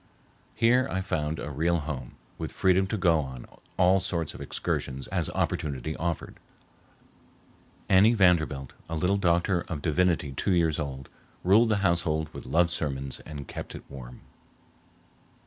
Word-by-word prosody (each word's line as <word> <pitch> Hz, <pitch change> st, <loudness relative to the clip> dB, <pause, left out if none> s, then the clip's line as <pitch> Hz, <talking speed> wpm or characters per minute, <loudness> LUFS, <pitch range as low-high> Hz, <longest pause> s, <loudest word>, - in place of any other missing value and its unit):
Here 125 Hz, +3 st, +4 dB
I 95 Hz, -, -1 dB
found 80 Hz, -4 st, -2 dB
a 75 Hz, -, -5 dB
real 85 Hz, +5 st, +1 dB
home, 70 Hz, -5 st, -6 dB, 0.2 s
with -, -, -4 dB
freedom 95 Hz, 0 st, +3 dB
to 110 Hz, -, -2 dB
go 85 Hz, -4 st, +3 dB
on 65 Hz, -4 st, -6 dB, 0.3 s
all 95 Hz, +1 st, +5 dB
sorts 85 Hz, -4 st, -2 dB
of -, -, -10 dB
excursions 65 Hz, -1 st, -3 dB
as -, -, 0 dB
opportunity 75 Hz, 0 st, -2 dB
offered. 85 Hz, -1 st, -3 dB, 1.5 s
Annie 100 Hz, +5 st, +6 dB
Vanderbilt, 80 Hz, -, +2 dB, 0.2 s
a 80 Hz, -, -2 dB
little 90 Hz, +5 st, +1 dB
doctor 85 Hz, 0 st, +2 dB
of 75 Hz, -4 st, -5 dB
divinity 85 Hz, -2 st, +1 dB
two 90 Hz, +8 st, 0 dB
years 85 Hz, -3 st, +2 dB
old, 65 Hz, -3 st, -5 dB, 0.4 s
ruled 110 Hz, +6 st, +5 dB
the 110 Hz, -, +3 dB
household 80 Hz, -3 st, +1 dB
with -, -, -9 dB
love 85 Hz, +5 st, +3 dB
sermons 70 Hz, -5 st, -3 dB
and 75 Hz, -3 st, -7 dB
kept -, -, -7 dB
it -, -, -9 dB
warm. 60 Hz, -3 st, -10 dB
80 Hz, 145 wpm, -27 LUFS, 70-95 Hz, 1.5 s, Annie